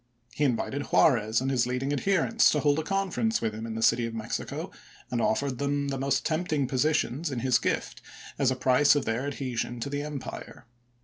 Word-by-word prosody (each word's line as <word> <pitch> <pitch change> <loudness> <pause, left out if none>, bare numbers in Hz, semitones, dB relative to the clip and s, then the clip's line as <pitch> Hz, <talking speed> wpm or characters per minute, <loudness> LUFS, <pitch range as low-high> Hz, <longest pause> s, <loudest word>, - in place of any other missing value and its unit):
He 145 - +1
invited 140 +2 -1
Juarez 115 -4 +3
and 135 +1 -1
his 120 -2 +1
leading 130 +3 -1
adherents 195 +8 +3
to 150 - +1
hold 145 +1 +2
a - - -2
conference 195 +4 0
with 110 -1 -2
him 110 +1 -6
in 110 - -5
the 110 - -2
City 115 0 +3
of 115 - -7
Mexico, 110 0 -4 0.4
and 120 -1 0
offered 130 +3 0
them 140 0 -1
the 135 -1 -3
most 135 0 0
tempting 155 -3 0
positions 150 +2 0
in 130 -4 -3
his 130 -1 +3
gift - - -2 0.4
as 135 -3 +3
a 130 - 0
price 130 +3 +4
of 145 - 0
their 115 +5 -1
adhesion 125 -4 -3
to 140 - -4
the 145 0 -2
empire. 145 -3 -7
135 Hz, 200 wpm, -27 LUFS, 120-145 Hz, 0.4 s, price